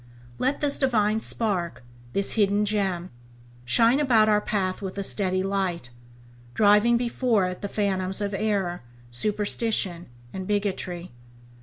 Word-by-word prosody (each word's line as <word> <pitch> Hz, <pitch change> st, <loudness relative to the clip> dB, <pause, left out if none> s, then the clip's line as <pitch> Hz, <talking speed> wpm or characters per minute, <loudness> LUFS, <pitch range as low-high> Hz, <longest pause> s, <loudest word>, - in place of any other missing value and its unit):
Let 265 Hz, +2 st, 0 dB
this 285 Hz, -1 st, +2 dB
divine 220 Hz, -5 st, +2 dB
spark, 185 Hz, -, -1 dB, 0.3 s
this 200 Hz, 0 st, +1 dB
hidden 205 Hz, -1 st, +2 dB
gem, 190 Hz, -4 st, -1 dB, 0.5 s
shine 230 Hz, -, +4 dB
about 235 Hz, -7 st, +4 dB
our 210 Hz, -1 st, +3 dB
path 195 Hz, -3 st, -2 dB
with 190 Hz, 0 st, -6 dB
a 200 Hz, -, -2 dB
steady 185 Hz, -1 st, 0 dB
light, 190 Hz, -9 st, -2 dB, 0.6 s
driving 210 Hz, +3 st, +5 dB
before 235 Hz, -4 st, +1 dB
it 180 Hz, 0 st, -5 dB
the 200 Hz, -, -3 dB
phantoms 190 Hz, -2 st, -1 dB
of 205 Hz, -1 st, -2 dB
error, 195 Hz, -4 st, -1 dB, 0.3 s
superstition, 205 Hz, -, -1 dB, 0.3 s
and 190 Hz, -1 st, -5 dB
bigotry. 190 Hz, -4 st, -2 dB
205 Hz, 130 wpm, -25 LUFS, 185-215 Hz, 0.6 s, driving